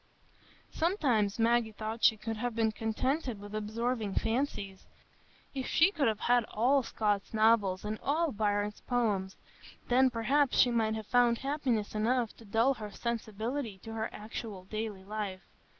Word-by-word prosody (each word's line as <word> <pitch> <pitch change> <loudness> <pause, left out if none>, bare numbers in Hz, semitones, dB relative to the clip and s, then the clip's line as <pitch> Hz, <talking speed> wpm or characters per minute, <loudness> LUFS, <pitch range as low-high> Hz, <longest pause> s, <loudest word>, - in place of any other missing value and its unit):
Sometimes 255 - +1
Maggie 230 -1 +2
thought 220 +2 -5
she 220 - +6
could 225 +1 -4
have 240 +1 -2
been 225 -1 +2
contented 235 +3 -2
with 205 +1 -10
absorbing 215 0 -2
fancies; 225 -5 -2 0.7
if 265 -2 -3
she 345 +4 +4
could 305 -9 +1
have 215 -2 0
had 245 0 +3
all 255 +7 +2
Scott's 210 -3 -1
novels 215 -4 +3
and 215 +1 -3
all 315 +2 +1
Byron's 205 -1 -1
poems!—then, 240 +3 0
perhaps, 260 +4 +1
she 245 - +5
might 220 -2 +1
have 220 -1 -5
found 240 0 +3
happiness 265 -6 -1
enough 230 +2 0
to 230 - -14
dull 225 +6 +3
her 215 -5 -7
sensibility 230 +1 -3
to 225 - -7
her 220 0 -2
actual 210 -2 -7
daily 215 0 -5
life. 200 -2 -5
225 Hz, 150 wpm, -31 LUFS, 210-245 Hz, 0.7 s, she